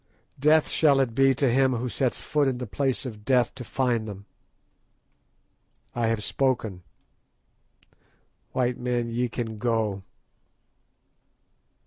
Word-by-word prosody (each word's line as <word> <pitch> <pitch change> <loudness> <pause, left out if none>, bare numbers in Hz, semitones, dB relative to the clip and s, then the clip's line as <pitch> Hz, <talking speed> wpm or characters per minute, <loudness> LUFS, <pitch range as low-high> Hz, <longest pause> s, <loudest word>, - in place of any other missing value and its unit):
Death 155 +2 +4
shall 145 -4 +3
it 130 -4 +1
be 135 +2 +4
to 135 +1 +1
him 130 +1 +3
who 125 +1 -2
sets 125 +1 -1
foot 150 -2 +1
in 130 -2 0
the 125 - -4
place 135 +5 -1
of 105 -4 -7
Death 125 0 +2
to 130 - -8
find 120 -3 -1
them. 100 -1 -8 1.7
I 120 -1 0
have 110 -2 -1
spoken. 115 -7 -1 1.7
White 125 -1 0
men, 120 -1 -1
ye 120 +1 -1
can 110 -2 -5
go." 110 -4 0
125 Hz, 125 wpm, -26 LUFS, 115-135 Hz, 1.7 s, Death